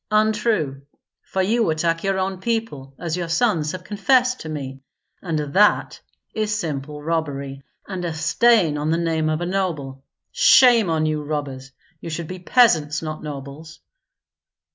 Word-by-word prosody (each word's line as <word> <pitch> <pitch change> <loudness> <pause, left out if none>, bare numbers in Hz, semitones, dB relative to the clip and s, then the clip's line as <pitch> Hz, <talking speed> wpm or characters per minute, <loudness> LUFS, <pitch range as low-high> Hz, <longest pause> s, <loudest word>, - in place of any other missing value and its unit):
"Untrue; 215 - +1 0.4
for 190 - -2
you 225 +1 +1
attack 165 +1 0
your 195 -1 0
own 190 0 -2
people, 190 - -3
as 170 -2 -3
your 175 -2 -4
sons 165 -6 +1
have 185 -1 -7
confessed 250 +5 +2
to 160 - -7
me, 135 -3 -6 0.4
and 165 -4 -2
that 150 +8 +2 0.3
is 210 -1 -1
simple 150 -3 -5
robbery, 140 -4 -3 0.3
and 185 -2 -5
a 170 - -2
stain 160 0 +2
on 150 +1 -2
the 165 - +2
name 160 -2 0
of 155 +1 -1
a - - -1
noble. 160 -8 -3 0.3
Shame 235 -7 +6
on 160 -1 +1
you, 155 -1 -1
robbers! 140 -3 -5 0.3
you 165 - -7
should 165 0 -4
be 185 +2 -7
peasants, 165 - +3
not 155 -1 -5
nobles." 145 +1 -9
165 Hz, 155 wpm, -22 LUFS, 150-195 Hz, 0.4 s, Shame